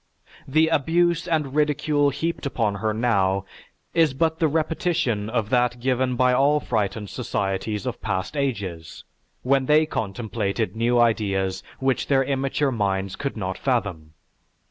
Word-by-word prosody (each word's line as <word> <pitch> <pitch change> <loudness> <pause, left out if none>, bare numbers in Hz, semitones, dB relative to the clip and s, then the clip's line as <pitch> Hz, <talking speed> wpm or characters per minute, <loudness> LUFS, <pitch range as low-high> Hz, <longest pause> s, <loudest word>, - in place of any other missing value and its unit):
The 155 +4 +3
abuse 170 +3 +2
and 155 -6 0
ridicule 150 -1 +2
heaped 160 +1 -3
upon 110 -6 0
her 110 -1 +1
now 100 -4 +1 0.5
is 160 -5 +3
but 160 +3 0
the 165 - +3
repetition 155 -8 0
of 110 -2 -2
that 120 -1 +2
given 130 0 0
by 125 +1 +3
all 140 +3 +3
frightened 105 -4 -2
societies 105 -2 -2
of 125 -2 -4
past 95 +5 -3
ages, 100 - -3 0.4
when 135 0 +2
they 155 +1 +5
contemplated 110 - -3
new 120 +2 +2
ideas 100 -5 +1 0.2
which 135 -1 0
their 135 -1 +3
immature 135 +1 0
minds 100 -4 -1
could 140 -4 -4
not 95 -2 -4
fathom. 95 - -2
125 Hz, 140 wpm, -24 LUFS, 105-145 Hz, 0.5 s, they